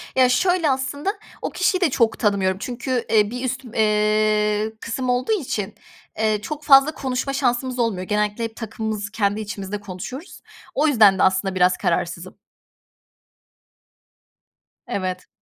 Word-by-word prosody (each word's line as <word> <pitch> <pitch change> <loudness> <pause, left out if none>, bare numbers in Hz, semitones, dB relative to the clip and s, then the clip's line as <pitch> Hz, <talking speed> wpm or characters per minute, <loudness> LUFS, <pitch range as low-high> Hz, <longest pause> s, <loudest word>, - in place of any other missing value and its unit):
Ya, 255 -1 +5
şöyle 350 +4 +2
aslında 270 +6 -1 0.3
o - - -2
kişiyi 370 0 0
de 355 - +3
çok 230 -4 +1
tanımıyorum 195 -4 +1
çünkü, 250 +1 -3
eee, 210 -1 +3
bir 250 +1 -5
üstüm 255 -2 -5
eee, 215 0 +2
kısım 250 +2 -3
olduğu 250 - 0
için, 250 - -2 0.4
eee, 215 -1 +1
çok 300 +5 -6
fazla 275 +1 +6
konuşma 265 0 -3
şansımız 255 -1 0
olmuyor, 220 -6 0
genellikle 210 +3 -1
hep 225 -1 -4
takımımızı 220 -2 -4
kendi 205 0 0
içimizde 205 -1 -5
konuşuyoruz. 205 - -8 0.3
O 305 +3 +3
yüzden 210 -8 +5
de - - +4
aslında 190 0 +1
biraz 180 0 +3
kararsızım. 175 0 -2 2.5
Evet. 185 -2 -3
220 Hz, 135 wpm, -22 LUFS, 205-260 Hz, 2.5 s, fazla